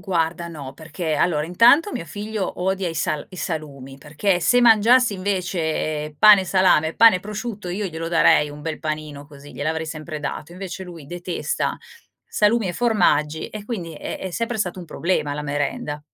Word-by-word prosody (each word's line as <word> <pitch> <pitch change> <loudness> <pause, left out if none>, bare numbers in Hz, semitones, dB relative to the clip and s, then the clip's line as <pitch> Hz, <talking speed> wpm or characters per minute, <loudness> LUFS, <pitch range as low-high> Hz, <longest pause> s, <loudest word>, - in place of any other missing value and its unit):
guarda 170 -2 -1
no, 140 -5 -8
perché 160 +1 -4
allora 150 -1 +1
intanto 235 - +5
mio - - -4
figlio 205 +2 -5
odia 190 -1 0
i 165 - -6
sal 155 -1 -2
i 185 - -11
salumi, 140 -6 -5
perché 155 +6 0
se 245 +7 +4
mangiasse 235 0 +5
invece 165 -5 -2
pane 210 -3 +8
e - - -6
salame, 180 -4 +3
pane 225 -4 +7
e - - -7
prosciutto 210 -1 -6
io 195 +3 -2
glielo 165 -1 -5
darei 165 -3 +4
un 145 0 -10
bel 160 -2 -4
panino 155 -2 -5
così, 145 -1 -14
gliel'avrei 160 +2 -3
sempre 155 0 -6
dato, 150 +3 -5
invece 185 0 -7
lui 165 -5 -11
detesta 175 - -3 0.5
salumi 210 -1 +2
e - - -2
formaggi 165 -9 +1
e 215 -1 -8
quindi 180 -8 -5
è - - -6
è 190 - -5
sempre 230 +4 -3
stato 185 -3 -2
un - - -8
problema 155 -2 -1
la 150 - -4
merenda 145 +1 -3
170 Hz, 180 wpm, -22 LUFS, 155-200 Hz, 0.5 s, pane